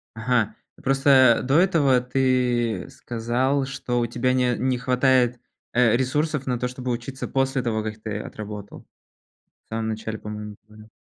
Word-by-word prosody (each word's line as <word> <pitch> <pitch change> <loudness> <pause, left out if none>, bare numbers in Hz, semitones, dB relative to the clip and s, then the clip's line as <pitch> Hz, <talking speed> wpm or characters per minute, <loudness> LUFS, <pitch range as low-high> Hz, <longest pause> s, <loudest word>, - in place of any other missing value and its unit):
Ага. 115 -1 0 0.3
Просто 135 -3 +5
до 135 +2 +1
этого 150 -9 +3
ты 125 -5 0
сказал, 125 +4 -1
что 125 -2 -2
у 120 - +1
тебя 125 +2 0
не 125 -1 +2
не 130 0 0
хватает, 125 -1 +2 0.3
э, 120 -2 +4
ресурсов 145 +2 -1
на 125 -2 -1
то, 125 - -1
чтобы 125 0 -4
учиться 120 +3 -4
после 135 0 0
того, 110 -2 -1
как 110 0 -5
ты 110 -1 -4
отработал. 105 -1 -8 0.8
В - - -45
самом 110 0 -3
начале, 110 0 -4
по-моему, 105 0 -7
говорил. 105 0 -15
125 Hz, 150 wpm, -24 LUFS, 110-130 Hz, 0.8 s, Просто